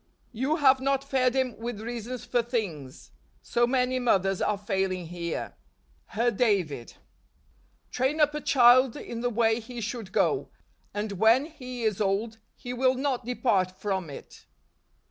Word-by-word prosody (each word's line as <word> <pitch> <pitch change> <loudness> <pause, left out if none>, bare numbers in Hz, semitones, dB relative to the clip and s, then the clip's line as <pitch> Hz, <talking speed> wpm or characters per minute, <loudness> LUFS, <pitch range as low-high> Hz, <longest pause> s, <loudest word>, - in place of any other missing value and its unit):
You 260 +6 0
have 270 -4 +5
not 275 0 0
fed 265 -2 +1
him 260 -3 0
with 235 -2 -5
reasons 240 +2 -6
for 240 0 +1
things. 195 - -5 0.3
So 240 0 +1
many 255 0 +1
mothers 195 -6 +1
are 210 - +1
failing 190 -3 -2
here." 170 0 -5 0.5
Her 235 +2 +1
David. 195 - 0 0.5
" - - -38
Train 265 +5 0
up 295 -1 +4
a 300 - -4
child 255 -1 +5
in 230 0 -6
the 245 - 0
way 225 0 +2
he 240 +1 -8
should 225 -2 -5
go: - - +1 0.4
and 205 0 -3
when 230 +6 +5
he 255 -6 -8
is 215 -2 0
old, 210 +3 -1 0.2
he 245 -1 -7
will 255 +1 +2
not 260 -2 -1
depart 220 -7 +1
from 190 -5 -2
it. 140 - -12
235 Hz, 155 wpm, -27 LUFS, 205-255 Hz, 0.5 s, have